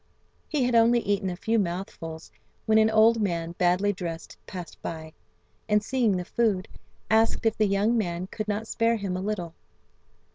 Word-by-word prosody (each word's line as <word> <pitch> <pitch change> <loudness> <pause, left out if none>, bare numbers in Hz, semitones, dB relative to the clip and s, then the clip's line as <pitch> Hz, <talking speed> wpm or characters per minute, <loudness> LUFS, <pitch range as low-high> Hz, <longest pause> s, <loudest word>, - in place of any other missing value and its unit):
He 295 -4 +1
had 245 0 +1
only 235 +1 +5
eaten 200 -2 0
a 180 - -4
few 225 +5 0
mouthfuls 170 -3 -5 0.3
when 220 0 +4
an 220 0 +4
old 220 +1 +5
man 170 -4 -1
badly 180 +3 +2
dressed 170 -3 -6
passed 180 -3 -8
by, 160 -1 -6 0.6
and 210 0 +3
seeing 235 -5 +1
the 180 - -4
food, 205 -3 0 0.4
asked 225 +1 +2
if 225 - +3
the 215 - +2
young 200 +4 +2
man 180 -5 -1
could 215 +3 -6
not 210 +1 -2
spare 230 +1 +1
him 200 -4 -3
a 185 - -3
little. 190 -5 -3
205 Hz, 175 wpm, -26 LUFS, 180-225 Hz, 0.6 s, only